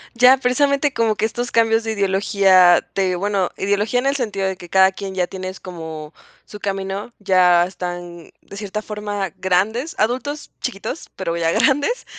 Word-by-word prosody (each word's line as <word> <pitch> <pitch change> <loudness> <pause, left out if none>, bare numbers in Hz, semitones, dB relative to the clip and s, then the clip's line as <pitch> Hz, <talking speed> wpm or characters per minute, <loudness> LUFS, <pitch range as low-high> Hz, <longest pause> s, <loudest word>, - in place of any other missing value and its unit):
Ya. 250 +2 +6
Precisamente 280 +2 +1
como 225 -2 +1
que - - 0
estos 240 +2 -3
cambios 225 0 +3
de 225 - -2
ideología 190 -2 +4
te 185 -2 0
bueno, 195 -1 0
ideología 205 +5 0
en 260 - -3
el 275 - +1
sentido 205 -7 -2
de 190 - -2
que 175 - -12
cada 190 +1 +5
quien 190 0 -7
ya 180 -1 0
tienes 185 0 -7
como 160 -3 -8 0.3
su 210 - -11
camino, 195 +3 -4
ya 180 -3 +4
están 175 -2 -7
de 200 - -12
cierta 210 +1 -4
forma 205 -2 -4
grandes, 215 - 0
adultos, 260 +7 -2
chiquitos, 250 +5 -5
pero 170 -3 -3
ya 165 -1 +1
grandes, 290 - +1
200 Hz, 165 wpm, -20 LUFS, 185-230 Hz, 0.3 s, Ya